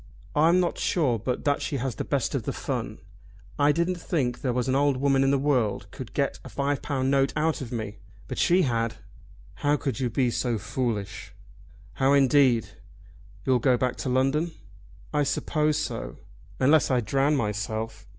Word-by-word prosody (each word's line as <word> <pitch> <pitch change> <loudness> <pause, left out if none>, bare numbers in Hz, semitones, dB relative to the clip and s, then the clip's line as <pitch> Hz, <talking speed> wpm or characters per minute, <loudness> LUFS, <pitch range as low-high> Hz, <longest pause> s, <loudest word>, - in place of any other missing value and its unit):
I'm 165 +4 +5
not 175 -1 0
sure 135 -10 +1
but 125 +4 -3
that 145 -1 +2
she 140 - -2
has 130 0 -2
the - - -4
best - - -1
of - - 0
the - - -3
fun. - - -4 0.6
I 145 +1 +5
didn't 170 +3 0
think 125 -9 -1
there 130 - 0
was 125 +1 -1
an 130 - +1
old 140 0 +2
woman 135 0 +3
in 135 - +3
the 140 - +3
world 125 -8 0
could 125 -2 -9
get 140 -1 0
a - - -9
five 140 0 -1
pound 135 -2 -1
note 135 0 +3
out 155 0 0
of 125 - -6
me; 110 -3 -5 0.3
but - - -5
she 180 +2 +4
had." 115 -3 0 0.6
"How 145 +1 +2
could 135 -2 -3
you 125 -2 0
be 120 +1 +1
so 120 -1 -1
foolish?" 105 -2 -4 0.6
"How 135 +1 +2
indeed! 135 -4 +4 0.8
You'll 130 -2 +3
go 125 +1 +3
back 125 0 0
to 130 - -3
London?" 135 +6 +1 0.6
"I 150 - +2
suppose 150 +2 0
so; - - -4 0.4
unless 145 +4 +4
I 130 -2 +3
drown 135 +7 +1
myself." 110 -1 -3
135 Hz, 180 wpm, -26 LUFS, 120-145 Hz, 0.8 s, I'm